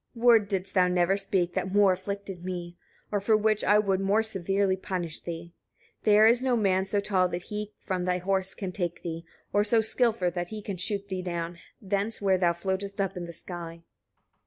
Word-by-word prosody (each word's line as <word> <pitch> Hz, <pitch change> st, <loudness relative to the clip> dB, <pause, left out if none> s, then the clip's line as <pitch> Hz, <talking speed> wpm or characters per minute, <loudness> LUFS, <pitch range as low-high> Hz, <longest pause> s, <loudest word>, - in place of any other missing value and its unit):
35. 230 Hz, -, -9 dB
"Word 230 Hz, -4 st, +6 dB
didst 195 Hz, -1 st, -3 dB
thou 185 Hz, -2 st, +4 dB
never 180 Hz, +1 st, +2 dB
speak 190 Hz, -3 st, 0 dB
that 190 Hz, -, -2 dB
more 200 Hz, -1 st, +5 dB
afflicted 195 Hz, -1 st, -6 dB
me, 175 Hz, -1 st, -5 dB, 0.4 s
or 205 Hz, -, +1 dB
for 215 Hz, +2 st, +3 dB
which 215 Hz, 0 st, +1 dB
I 205 Hz, -, +5 dB
would 195 Hz, -3 st, +2 dB
more 200 Hz, +3 st, +2 dB
severely 195 Hz, -2 st, 0 dB
punish 180 Hz, -4 st, -3 dB
thee. 170 Hz, 0 st, -7 dB, 0.5 s
There 210 Hz, 0 st, +6 dB
is 235 Hz, +2 st, +5 dB
no 255 Hz, -2 st, +2 dB
man 190 Hz, -3 st, +2 dB
so 200 Hz, +1 st, 0 dB
tall 190 Hz, -2 st, +2 dB
that 175 Hz, 0 st, -4 dB
he 210 Hz, +1 st, -5 dB
from 185 Hz, -3 st, -3 dB
thy 180 Hz, 0 st, +1 dB
horse 190 Hz, +1 st, -1 dB
can 190 Hz, -3 st, -4 dB
take 175 Hz, -2 st, -3 dB
thee, 165 Hz, 0 st, -5 dB, 0.3 s
or 205 Hz, -, +4 dB
so 225 Hz, +2 st, +3 dB
skilful 220 Hz, -4 st, +1 dB
that 175 Hz, 0 st, -3 dB
he 215 Hz, -1 st, -7 dB
can 200 Hz, -2 st, -4 dB
shoot 200 Hz, +2 st, -2 dB
thee 190 Hz, -2 st, -3 dB
down, 170 Hz, -1 st, -4 dB, 0.2 s
thence 200 Hz, +1 st, -2 dB
where 190 Hz, -2 st, +2 dB
thou 175 Hz, -2 st, +4 dB
floatest 195 Hz, +3 st, -3 dB
up 195 Hz, 0 st, -1 dB
in 180 Hz, -1 st, -5 dB
the -, -, -7 dB
sky." 170 Hz, -1 st, -8 dB
195 Hz, 205 wpm, -28 LUFS, 180-205 Hz, 0.5 s, Word